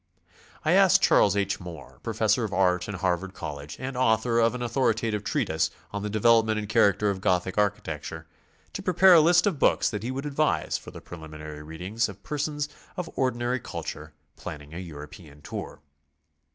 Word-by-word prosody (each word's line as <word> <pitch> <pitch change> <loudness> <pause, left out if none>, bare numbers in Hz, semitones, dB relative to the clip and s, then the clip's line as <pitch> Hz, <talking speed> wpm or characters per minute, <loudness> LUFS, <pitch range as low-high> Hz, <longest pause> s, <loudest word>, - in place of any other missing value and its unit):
I - - +3
asked - - +5
Charles 100 -1 +4
H. 100 0 0
Moore, 75 -9 -10
Professor - - +1
of - - -3
Art 90 -1 +2
in 105 - -4
Harvard 95 +1 -1
College 70 0 -7
and 130 0 -5
author 115 -1 +2
of 115 +1 +3
an 125 - -4
authoritative 115 -3 0
treatise 90 - 0 0.2
on 105 - -3
the 105 - -3
De 110 +1 -2
velopment 110 -1 +4
and 105 -1 -3
Character 105 -2 +3
of 95 -1 -5
Gothic 90 0 +1
Architecture, 80 -6 -2 0.5
to - - -4
prepare 185 +1 +6
a 165 - +8
list 175 +3 +5
of 195 -9 0
books - - +3
that 105 -3 -4
he 115 - -4
would 135 +2 -4
advise 140 - 0
for - - -5
the - - -10
preliminary 75 -2 -9
read 80 +2 -10
ing 105 +5 -7
of 100 -1 -11
persons 150 0 -2 0.3
of 180 -2 -4
ordinary 125 -1 0
culture 75 -7 -7 0.2
planning 75 0 -8
a 85 - -5
European 75 -2 -10
tour. - - -7
105 Hz, 180 wpm, -26 LUFS, 80-120 Hz, 0.5 s, a